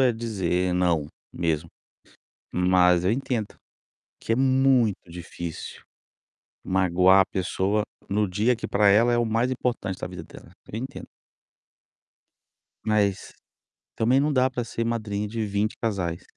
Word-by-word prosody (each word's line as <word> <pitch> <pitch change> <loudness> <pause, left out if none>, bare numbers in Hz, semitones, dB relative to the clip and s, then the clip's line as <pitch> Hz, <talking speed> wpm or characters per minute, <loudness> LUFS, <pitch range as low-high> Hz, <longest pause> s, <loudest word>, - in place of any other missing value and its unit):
é 130 -2 +4
dizer 95 -6 -1
"não", 85 -5 +1 0.3
mesmo. 85 -1 -1 0.9
Mas 90 -1 +4
eu 95 - +3
entendo 120 -3 -2 0.6
que - - -4
é - - +2
muito 130 -7 +2
difícil 85 -1 -7 0.8
magoar 95 0 +4
a - - +2
pessoa 95 +3 -1 0.3
no 105 +1 +1
dia 110 +7 +1
que, - - -6
pra 100 0 +3
ela, 115 +4 +4
é - - +2
o 120 - +2
mais 115 +3 0
importante 120 -7 -2
da - - -4
vida 90 -2 -8
dela. - - -14 0.2
Eu 110 - -4
entendo. 130 +2 -7 1.8
Mas, 105 -3 0 0.6
também, 125 +4 +3
não 150 +2 +1
dá 130 0 +3
pra 125 -2 -3
ser 115 0 -4
madrinha 105 -3 -2
de 110 0 -3
20 105 +2 -1
casais. 95 -7 -2
105 Hz, 140 wpm, -25 LUFS, 90-115 Hz, 1.8 s, é